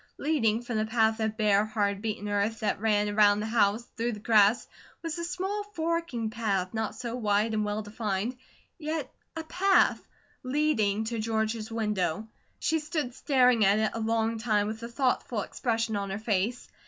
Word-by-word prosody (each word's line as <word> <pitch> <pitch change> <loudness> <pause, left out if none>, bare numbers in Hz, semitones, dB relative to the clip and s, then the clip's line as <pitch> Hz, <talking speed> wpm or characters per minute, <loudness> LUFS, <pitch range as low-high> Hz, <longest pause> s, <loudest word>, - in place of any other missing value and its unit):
Leading 240 -7 +1
from 240 -2 -3
the 215 - 0
path 220 -1 +2
of 220 0 -1
bare, 210 -2 +3
hard 205 -2 -1
beaten 210 -1 -3
earth 205 +3 -1
that 215 - 0
ran 210 -2 +2
around 205 0 +4
the 210 - -2
house 220 0 +2
through 235 +1 -1
the 210 - -7
grass, 215 +1 +4 0.4
was 330 +1 -3
a - - -3
small 375 +4 -2
forking 325 -9 -1
path 200 -5 -1
not 220 -1 -2
so 235 +1 -5
wide 215 -1 +1
and 215 -1 +1
well 210 +1 -2
defined, 210 +2 -3 0.4
yet 315 0 -3 0.2
a 325 - -4
path, 380 +4 +3 0.4
leading 255 -7 +1
to 225 +1 -3
George's 220 0 -1
window. 210 -3 -1 0.3
She 320 - 0
stood 300 -5 -3
staring 250 -4 +3
at 200 +1 +4
it 220 0 +1
a 230 - -4
long 225 0 0
time 215 -3 +1
with 220 +2 -5
a 235 - -5
thoughtful 245 -3 0
expression 225 0 -1
on 200 -1 -2
her 195 - -3
face. 215 +2 -1
220 Hz, 180 wpm, -28 LUFS, 210-245 Hz, 0.4 s, around